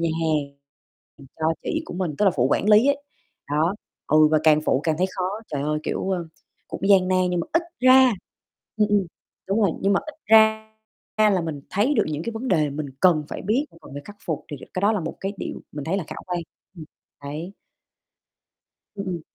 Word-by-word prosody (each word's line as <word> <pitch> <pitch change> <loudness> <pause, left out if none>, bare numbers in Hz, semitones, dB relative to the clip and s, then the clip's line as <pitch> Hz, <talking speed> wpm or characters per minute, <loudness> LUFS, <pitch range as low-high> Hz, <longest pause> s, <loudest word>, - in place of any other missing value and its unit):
nhà 170 - +1
hàng 150 -3 -1 0.6
giùm 140 - -14
cho 160 0 +1
chị 320 0 -2
của - - -8
mình, 175 -5 -2
tức 210 - +3
là 195 - +6
phụ 125 -1 +3
quản 205 - +1
lý 215 +4 +6
ấy, 280 0 +1 0.5
đó, 160 +6 +1 0.3
ừ, 155 0 +5
và 155 - +4
càng 155 -1 +5
phụ 130 - +2
càng 160 -2 +1
thấy 185 - +2
khó. 185 - -1 0.3
Trời 140 - -1
ơi, 150 +1 0
kiểu, 195 - -2
ờ, 175 -3 -2 0.4
cũng - - -6
gian 185 -2 +5
nan, 185 - +2
nhưng 175 - 0
mà - - -4
ít 330 - +3 0.2
ra 255 0 +7 0.6
ừm, 210 -1 +2
ừm, 205 -2 +2 0.4
đúng 200 +3 +1
rồi, 200 - +3
nhưng 195 - +2
mà 195 - +2
ít 310 - -10
ra 220 0 +5 0.5
ra 215 -1 +5
là 190 - +2
mình 160 -4 -4
thấy 225 +9 +1
được - - +3
những 155 0 -3
cái 230 - -3
vấn 230 +4 -5
đề 155 -7 +2
mình 145 +1 -4
cần 165 -5 +4
phải - - -6
biết, 245 +9 0 0.2
cần - - -13
phải 145 - -6
khắc 205 0 -12
phục, 160 -4 -3
thì 145 - -5
được 130 - -12
cái 185 - -1
đó 205 +2 +3
là 210 - -1
một 165 0 -5
cái 195 +1 -3
điều - - -6
mình 145 -1 -6
thấy 170 +6 -1
là 195 - -3
khả - - -8
quan. 180 -1 -2 0.4
Ừm, 160 - -8 0.4
đấy. 155 +7 -6 1.4
Ừm, 200 -1 -5
ừm. 175 -3 -3
185 Hz, 230 wpm, -23 LUFS, 155-210 Hz, 1.4 s, ra